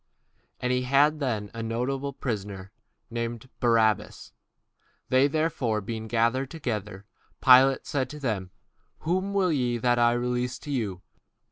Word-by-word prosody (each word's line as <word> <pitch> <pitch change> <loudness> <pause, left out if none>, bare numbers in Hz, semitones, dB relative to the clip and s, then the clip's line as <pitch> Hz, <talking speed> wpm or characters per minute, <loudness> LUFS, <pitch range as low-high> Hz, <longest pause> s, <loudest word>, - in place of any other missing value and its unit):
And 125 - -1
they 125 0 +1
had 140 +4 +3
then 110 -7 -2
a 115 - -5
notable 125 +5 -2
prisoner, 100 -7 -5 0.4
called 115 +1 -4
Barabbas. 115 -4 +1 0.8
Therefore 140 -4 +2
when 100 - -11
they 110 0 -4
were 110 - -8
gathered 120 +4 +1
together, 105 - -5 0.3
Pilate 130 +1 +6
said 135 -3 -1
unto 150 - -9
them, 110 -10 -2 0.5
Whom 185 +5 -1
will 185 -3 +3
ye 125 -5 0
that 120 +1 +2
I 120 0 +4
release 125 0 -1
unto 145 - -8
you? 105 -9 -2
125 Hz, 140 wpm, -27 LUFS, 110-135 Hz, 0.8 s, Pilate